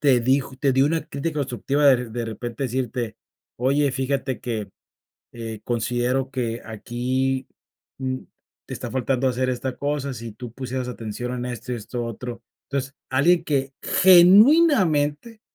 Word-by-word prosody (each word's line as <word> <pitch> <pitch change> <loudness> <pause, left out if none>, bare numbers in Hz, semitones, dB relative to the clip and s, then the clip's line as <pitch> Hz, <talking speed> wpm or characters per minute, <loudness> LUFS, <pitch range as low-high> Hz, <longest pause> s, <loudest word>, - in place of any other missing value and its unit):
te 130 -4 +4
dijo 130 +2 +1
te 140 -1 +2
dio 135 +2 +4
una 165 +1 0
crítica 150 +2 -3
constructiva, 140 +2 0
de 125 -3 +5
de 120 +1 -4
repente, 115 +4 -5
decirte: 125 -2 -2 0.4
"Oye, 140 +3 +2
fíjate 135 0 -2
que, 110 -4 -4 0.6
eh, 115 -2 -6
considero 120 +3 0
que 120 -3 -2
aquí, 125 +4 -2 0.5
mm, 130 0 -2 0.5
te - - -7
está - - -5
faltando 130 0 0
hacer 130 0 0
esta 130 +1 -3
cosa. 145 -1 -2
Si 115 -2 -7
tú 120 +1 -8
pusieras 130 0 -4
atención 120 +1 -5
en 125 0 -3
esto 125 +1 -7
y - - -2
esto 120 +1 -5
otro". 120 +1 -6 0.3
Entonces, 135 0 -3
alguien 160 +6 +3
que 135 -3 -1
genuinamente 190 - +5
130 Hz, 145 wpm, -23 LUFS, 120-140 Hz, 0.6 s, de